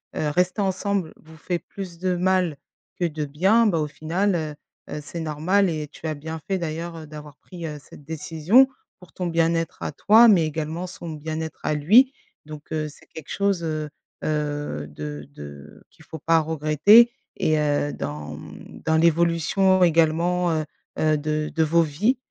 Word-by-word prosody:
heu, 150 - 0
rester 180 +6 +1
ensemble 190 -2 -1
vous 160 0 -17
fait 175 +3 -2
plus 175 +1 -9
de 180 0 0
mal 180 -4 +1 0.4
que 175 - +1
de 155 -2 -2
bien, 190 +11 +3
bah, 170 -6 +2
au 150 - -1
final, 175 +6 -1
heu 155 -2 -3 0.4
heu, 150 - -4
c'est 165 +3 -7
normal 170 +6 +1
et 155 -2 -4
tu 155 - -13
as 155 - -1
bien 160 +2 -6
fait 190 -1 0
d'ailleurs, 165 +1 -4
heu, 155 -2 -9
d'avoir 150 -2 -10
pris, 175 -2 -9
heu, 150 -2 -5
cette 145 - -15
décision. 160 - +3 0.3
Pour 180 -2 -16
ton 180 - -4
bien-être 165 0 0
à - - -2
toi 225 +3 +6
mais 175 -6 +5
également 160 +3 -3
son 175 -2 -8
bien-être 160 +1 -5
à 155 - 0
lui. 225 - +5 0.3
Donc, 150 -1 -11
heu, 155 -1 -1
c'est - - -18
quelque 160 -2 -11
chose, 200 -3 0
heu 155 -2 -3 0.3
heu, 145 - -2
de 75 -1 -7
de 70 0 -11
qu'il - - -20
faut 160 - -8
pas 165 +2 +3
regretter 160 +10 +5 0.2
et 155 0 +1
heu, 145 -1 +1
dans, 75 +1 -6
hem, - - -12
dans 160 - +2
l'évolution 170 +3 +3
également, 170 +2 +2
heu 155 - 0 0.4
heu, 155 -1 +3
de 155 +1 -2
de 160 - +2
vos 170 +2 +3
vies, 185 - +1
160 Hz, 180 wpm, -24 LUFS, 150-180 Hz, 0.4 s, toi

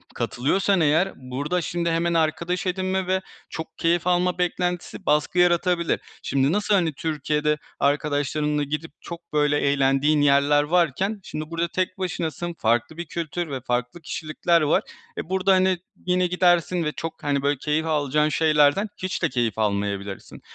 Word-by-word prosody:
katılıyorsan 190 +9 +1
eğer 160 +5 +2
burada, 140 +7 -3
şimdi, 170 +1 -2
hemen 170 +1 +1
arkadaş 170 +3 0
edinme 185 0 -1
ve 190 0 +1 0.3
çok 160 0 -7
keyif 170 +1 +1
alma 180 0 +2
beklentisi 180 0 -2
baskı 150 +4 +1
yaratabilir. 175 -1 +2 0.2
Şimdi 135 +1 +1
nasıl, 210 +2 +1
hani, 170 -5 +1
Türkiye'de 150 0 -1 0.2
arkadaşlarınla 145 +1 0
gidip 150 +3 -4
çok, 170 -1 -10
böyle, 150 -1 +3
eğlendiğin 140 +2 +2
yerler 145 +1 +4
varken 180 +6 +1
şimdi 155 +1 -6
burada 165 +1 0
tek 185 +2 -2
başınasın, 175 -2 -3
farklı 120 +3 0
bir 170 - -4
kültür 170 0 -4
ve 130 -2 -4
farklı 125 +6 -2
kişilikler 165 +2 0
var. 150 - +2 0.3
E, - - -5
burada, 190 +1 +3
hani, 185 0 +3 0.3
yine 180 0 +2
gidersin 175 -1 +2
ve 150 - -1
çok, 165 0 -7
hani, 140 -1 0
böyle, 145 +1 +1
keyif 150 +4 -1
alacağın 150 -1 +1
şeylerden 155 +5 +3
hiç 185 0 -3
de - - +3
keyif 120 -4 -1
almayabilirsin. 100 -1 -2
160 Hz, 150 wpm, -24 LUFS, 145-180 Hz, 0.3 s, yerler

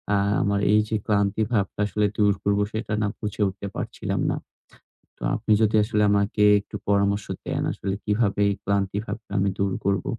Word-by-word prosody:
আ - - +3 0.3
আমার 100 0 +1
এই 105 - +5
যে 110 - 0
ক্লান্তি 100 0 +1
ভাবটা 100 -3 -1
আসলে 105 +1 0
দূর 105 -1 +4
করব, 100 0 +2
সেটা 110 -1 -3
না 105 - +1
বুঝে 105 -1 -4
উঠতে 100 +1 -6
পারছিলাম - - -3
না। - - -1 0.8
তো - - -36
আপনি 110 0 -2
যদি 110 0 +3
আসলে 105 -1 +1
আমাকে 100 +1 +2 0.2
একটু 100 - -11
পরামর্শ 100 0 +2 0.2
দেন, - - -2
আসলে 95 - -3
কিভাবে 105 -1 +1
এই 100 - 0
ক্লান্তি 100 -1 0
ভাবটা 110 -3 -7
আমি 100 +1 +2
দূর 100 -1 +1
করব? 100 0 +1
100 Hz, 185 wpm, -24 LUFS, 100-105 Hz, 0.8 s, এই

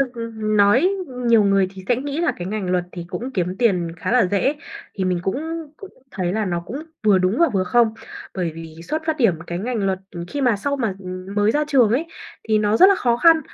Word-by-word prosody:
thực 270 - +2 0.3
nói 215 - +3 0.4
nhiều 230 -2 +5
người 195 -1 +3
thì 190 -1 -11
sẽ 245 - +3
nghĩ 285 +4 -3
là 340 - +1
cái 175 - -6
ngành 200 -2 -3
luật 180 -1 +1
thì 175 - -6
cũng 250 +8 -5
kiếm 180 -3 -2
tiền 180 -8 +1
khá 170 - -3
là 245 -5 +4
dễ, 205 +10 +1 0.4
thì 190 - -2
mình 180 -1 0
cũng 320 - -3
cũng 395 +3 -11 0.2
thấy 180 -7 -2
là 215 +1 0
nó 175 -3 -2
cũng 190 +9 -7 0.3
vừa 205 -3 +5
đúng 185 +5 +1
và 335 - +5
vừa 190 -2 +1
không. 225 +3 +2 0.4
Bởi 180 -3 -1
vì 165 -1 -9
xuất 310 - -3
phát 315 -1 0
điểm 230 - +3
cái 175 - -4
ngành 220 -1 -2
luật, 190 -1 0 0.2
ừm, 170 0 -6
khi 285 - -4
mà 245 -5 +3
sau 280 +8 -2
mà, 225 -7 -1
ừm, 185 +1 -7
mới 205 +1 +3
ra 300 +5 +1
trường 255 -7 +4
ấy, 270 +9 +1 0.4
thì 215 -1 +3
nó 210 +1 +2
rất 375 - +8
là 400 - +5
khó 240 -10 +1
khăn 325 +5 +5
215 Hz, 245 wpm, -21 LUFS, 185-260 Hz, 0.4 s, rất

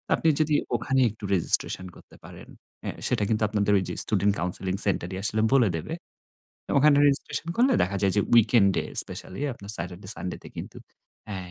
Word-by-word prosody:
আপনি 160 - +1
যদি 150 -1 +2 0.2
ওখানে 130 +3 0
একটু 110 -1 -18
রেজিস্ট্রেশন 95 +1 0
করতে - - -17
পারেন, - - -12 0.4
অ্যা - - -3 0.2
সেটা 105 - 0
কিন্তু 110 0 +1
আপনাদের 105 -1 +1
ঐ - - +3
যে - - -4
স্টুডেন্ট 100 -1 +1
কাউন্সেলিং 90 +1 -2
সেন্টারই 95 -1 -2
আসলে 110 0 0
বলে 120 -7 +4
দেবে। 80 - -6 0.9
ওখানে 145 +1 +5
রেজিস্ট্রেশন 145 +3 -1
করলে 255 +3 +4
দেখা 100 +2 -1
যায় 95 -2 +2
যে, - - +4
উইকেন্ডে 110 -4 +4 0.2
স্পেশালি 95 - -8
আপনার 100 -1 -8
স্যাটারডে, 90 +3 -7
সানডেতে 90 - -7
কিন্তু - - -8 0.5
অ্যা 105 -2 -5
105 Hz, 165 wpm, -26 LUFS, 95-120 Hz, 0.9 s, ওখানে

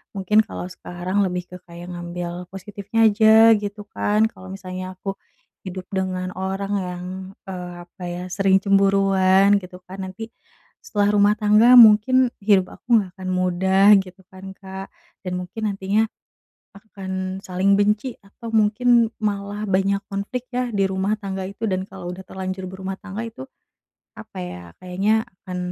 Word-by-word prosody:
mungkin 200 +2 +2
kalau 180 - -7
sekarang 180 +2 -4
lebih 180 -1 -3
ke 180 - -8
kayak 175 +1 -9
ngambil 175 0 -6
positifnya 205 +3 0
aja 220 +1 +7
gitu 205 0 -6
kan, 210 +1 +1
kalau 185 - -13
misalnya 185 -1 -7
aku 195 +1 -5 0.5
hidup 185 0 -6
dengan 185 -1 -2
orang 195 +1 -3
yang, 180 -1 -5 0.4
eee, 180 -2 -6
apa 180 +1 -13
ya, 175 +1 -5
sering 195 0 +3
cemburuan 195 0 +4
gitu 180 -1 -12
kan, 190 +1 -7
nanti 225 +5 -8 0.5
setelah 205 -1 +1
rumah 205 +1 +4
tangga 215 +4 +6
mungkin 240 +3 +6
hidup 195 -3 +3
aku 235 -2 +3
gak 185 - -12
akan 185 0 -4
mudah 190 +3 +4
gitu 190 0 -9
kan 190 0 -10
Kak, 190 0 -8 0.4
dan 180 - -2
mungkin 215 +4 -4
nantinya 200 +3 0 0.7
akan 190 -2 -6
saling 190 +1 +1
benci 210 +5 +1
atau 225 +3 -10
mungkin 225 +2 +3
malah 205 0 -3
banyak 195 0 +1
konflik 200 +6 -4
ya 250 0 -1
di 200 -4 +1
rumah 190 +3 -1
tangga 195 -2 -4
itu, 210 +3 -5
dan 185 -3 -1
kalau 180 -2 -7
udah 185 - -9
terlanjur 190 0 -5
berumah 190 +1 -5
tangga 205 +2 -6
itu, 225 -12 -9 0.8
apa - - -11
ya, 90 0 -7 0.2
kayaknya 195 +5 +1 0.2
akan, 185 -1 -5
195 Hz, 150 wpm, -22 LUFS, 185-210 Hz, 0.8 s, aja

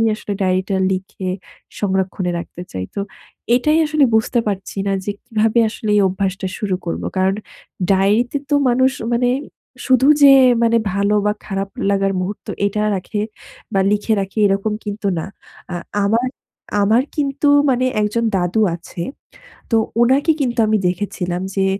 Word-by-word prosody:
আসলে 205 - -5
ডায়েরিটা 185 +1 0 0.2
লিখে 190 0 -4 0.5
সংরক্ষণে 190 -2 -1
রাখতে 175 +1 -9
চাই। 95 0 -4
তো - - -2 0.6
এটাই 305 +5 +2
আসলে 305 -1 +2
বুঝতে 220 +2 +2
পারছি 195 -1 -4
না - - +1
যে 205 - -1
কীভাবে 225 0 +1
আসলে 215 0 -5
এই 205 - +5
অভ্যাসটা 190 +1 -2
শুরু 200 -3 -1
করবো? 170 - -3
কারণ 190 +1 +2 0.6
ডায়েরিতে 210 +8 +2
তো 290 - +3
মানুষ 260 +2 +3 0.2
মানে 245 +1 +2 0.6
শুধু 260 0 +4
যে 280 -1 +9 0.3
মানে 230 0 +3 0.2
ভালো 200 +1 +1
বা 210 - +2
খারাপ 195 -1 -3 0.2
লাগার 195 -1 +1
মুহূর্ত 190 +3 -5 0.2
এটা 210 +1 -1
রাখে 200 +2 -3 0.5
বা 195 - +2
লিখে 210 +2 +1
রাখে 195 +2 -5
এরকম 200 +2 0
কিন্তু 205 0 -3
না। - - -4 0.5
আ - - -2 0.3
আমার, 230 +5 +1 0.5
আমার 220 +5 +3
কিন্তু 285 0 0 0.2
মানে 255 0 +2 0.2
একজন 210 +3 0
দাদু 185 +4 +1
আছে। 170 0 -9 0.7
তো 225 - +4 0.2
ওনাকে 270 +6 +4
কিন্তু 245 -3 -1
আমি 215 0 +3
দেখেছিলাম 180 -1 -2
যে 195 0 +2
205 Hz, 150 wpm, -19 LUFS, 190-235 Hz, 0.7 s, যে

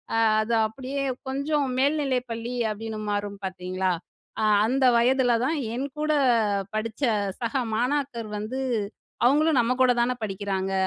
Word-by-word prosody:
அ - - +2 0.2
அது 230 +2 0
அப்டியே 270 +4 -4 0.2
கொஞ்சம் 280 +2 0
மேல்நிலை 280 -2 +2
பள்ளி 230 +2 -4 0.2
அப்டின்னு 220 0 -5
மாறும் 205 -1 -3
பாத்தீங்களா? 185 0 -2 0.5
அ - - +1 0.2
அந்த 265 +2 +2
வயதுல 245 +1 +3
தான் 320 +3 0 0.2
என் 270 +3 -2
கூட 305 0 +1 0.6
படிச்ச 220 +4 -3 0.4
சக 235 +1 -2 0.2
மாணாக்கர் 250 -2 -1
வந்து 240 +5 -4 0.7
"அவங்களும் 295 +1 +4
நம்ம 240 +2 +1
கூட 255 - +5
தான 250 +1 0
படிக்கிறாங்க. 195 -1 -2
245 Hz, 130 wpm, -25 LUFS, 215-275 Hz, 0.7 s, கூட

